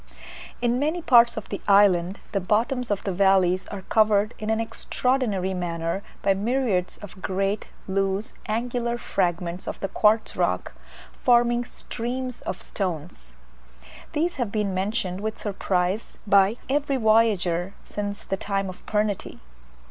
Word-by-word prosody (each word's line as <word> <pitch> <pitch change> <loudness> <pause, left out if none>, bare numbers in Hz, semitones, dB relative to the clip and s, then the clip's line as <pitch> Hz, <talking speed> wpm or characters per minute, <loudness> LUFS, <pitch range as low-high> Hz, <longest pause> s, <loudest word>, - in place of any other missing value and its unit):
In 240 +1 +2
many 310 +5 0
parts 235 -5 +5
of - - -5
the 200 - -4
island 195 -2 +4
the 200 - +1
bottoms 230 +6 0
of 205 -2 -1
the 195 - -1
valleys 185 -1 +3
are 200 -2 -7
covered 215 +1 +3
in 215 0 -4
an 220 0 +2
extraordinary 225 -3 -1
manner 170 0 -2 0.2
by 195 - +4
myriads 205 -3 0
of 195 -1 -10
great 195 +2 -1 0.2
loose 195 +2 -1
angular 235 +2 -1
fragments 175 -4 -2
of - - -4
the 195 - -2
quartz 215 +3 +2
rock, - - 0 0.4
forming 240 -1 +3
"streams 250 +2 -5
of - - -4
stones." 160 - -5 0.8
These 335 +4 0
have 240 -6 -1
been 210 -3 -1
mentioned 190 -1 -2
with 215 0 -3
surprise 195 0 -1
by 200 +2 +4
every 280 0 +1
voyager 205 -6 +2
since 205 0 -4
the 195 - -2
time 195 -1 -2
of 185 - -10
Pernety. 210 -2 -1
205 Hz, 140 wpm, -25 LUFS, 190-235 Hz, 0.8 s, parts